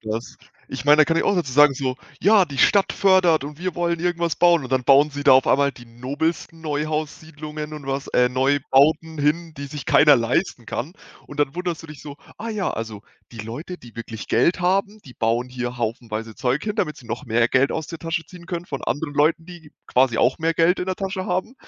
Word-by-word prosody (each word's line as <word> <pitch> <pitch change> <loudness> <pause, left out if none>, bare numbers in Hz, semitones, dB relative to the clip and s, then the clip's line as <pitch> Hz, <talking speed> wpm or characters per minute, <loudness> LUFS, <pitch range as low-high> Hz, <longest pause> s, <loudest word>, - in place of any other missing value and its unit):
was. 110 +2 -5 0.3
Ich - - -6
meine, 150 +1 +7
da 155 - +7
kann 165 +1 0
ich - - +1
auch 200 - +2
sozusagen 145 -4 +4
so: 130 -1 -3 0.3
„Ja, 200 -1 +5
die 140 - -8
Stadt 200 +8 +3
fördert 185 -6 +3
und 145 +1 -8
wir 180 -1 -3
wollen 170 -1 -1
irgendwas 170 -3 -1
bauen.“ 170 -2 +4
Und 125 - -7
dann 130 -1 +1
bauen 140 +2 +5
sie 145 0 -5
da 140 -2 +6
auf 130 0 +5
einmal 140 0 +3
die 120 -2 -14
nobelsten 145 +7 -4
Neuhaussiedlungen 155 0 -4
und 145 -2 -9
was 135 0 -3
äh, 125 0 +2
Neubauten 145 +4 +2
hin, 160 +3 0
die 140 0 -7
sich 140 -2 -7
keiner 145 -2 +6
leisten 120 +3 -1
kann 135 +9 -5 0.3
und 145 - -12
dann 140 0 0
wunderst 175 -2 -4
du - - -11
dich 150 -3 -11
so: 145 -1 -9 0.2
„Ah 230 +2 -6
ja, 210 -4 -2
also, 110 -2 -6 0.3
die - - -12
Leute, 130 - -7
die 120 -7 -16
wirklich 115 -1 -7
Geld 170 +10 +2
haben, 195 +4 0
die 125 - -13
bauen 120 +2 -1
hier 125 -1 -4
haufenweise 115 -1 -4
Zeug 130 +4 -1
hin, 210 0 -3
damit 150 -7 -1
sie 120 - -15
noch - - -5
mehr 115 +1 +2
Geld 135 +1 +2
aus 160 -1 -3
der 165 +1 -8
Tasche 165 0 -3
ziehen 175 -2 -14
können 175 -1 -4
von 140 -6 -6
anderen 145 0 -3
Leuten, 155 +3 +2
die 165 -4 -13
quasi 125 -2 +2
auch 125 +5 +2
mehr 165 0 0
Geld 170 +3 +3
in 180 - -3
der 185 -1 -2
Tasche 190 -1 -4
haben 185 +8 -2
150 Hz, 225 wpm, -22 LUFS, 130-170 Hz, 0.3 s, meine